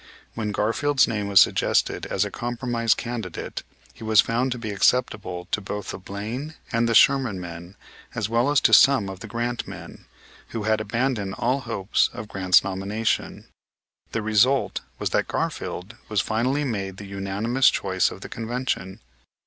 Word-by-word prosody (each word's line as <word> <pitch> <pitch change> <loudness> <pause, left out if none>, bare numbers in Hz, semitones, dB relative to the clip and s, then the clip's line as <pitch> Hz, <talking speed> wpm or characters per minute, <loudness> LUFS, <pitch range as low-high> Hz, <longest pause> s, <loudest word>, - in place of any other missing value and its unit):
When 110 -2 -3
Garfield's 130 +7 +2
name 105 -3 -2
was 100 -1 +6
suggested - - +2
as - - 0
a - - -5
compromise 120 -1 0
candidate 115 -7 -5 0.3
he - - -12
was 110 -1 +4
found 120 +4 +2
to 125 - -2
be 110 -3 -5
acceptable 100 -5 0
to 105 - 0
both 105 +1 -5
the - - -7
Blaine 110 - -6 0.2
and 115 0 +1
the 115 - +1
Sherman 135 -9 +4
men 85 +1 -9 0.4
as 110 -3 -1
well 115 +4 +2
as 145 -1 +4
to - - +3
some 135 -8 +6
of 95 -1 -8
the - - -8
Grant 120 0 -3
men, - - -10 0.4
who 115 - -5
had 110 0 +1
abandoned 115 -4 -1
all 130 +3 0
hope 115 -6 -6 0.2
of 110 - -7
Grant's 95 -2 +3
nomination. 100 +3 -2 0.7
The 115 - -2
result 115 +6 +2 0.2
was - - -2
that - - +1
Garfield 95 +6 -4
was 105 -2 +1
finally 125 +8 0
made 100 -7 -3
the 100 - -8
unanimous 100 +6 +1
choice 95 -1 +1
of - - -10
the - - -8
convention. 115 -5 -3
110 Hz, 165 wpm, -24 LUFS, 100-120 Hz, 0.7 s, was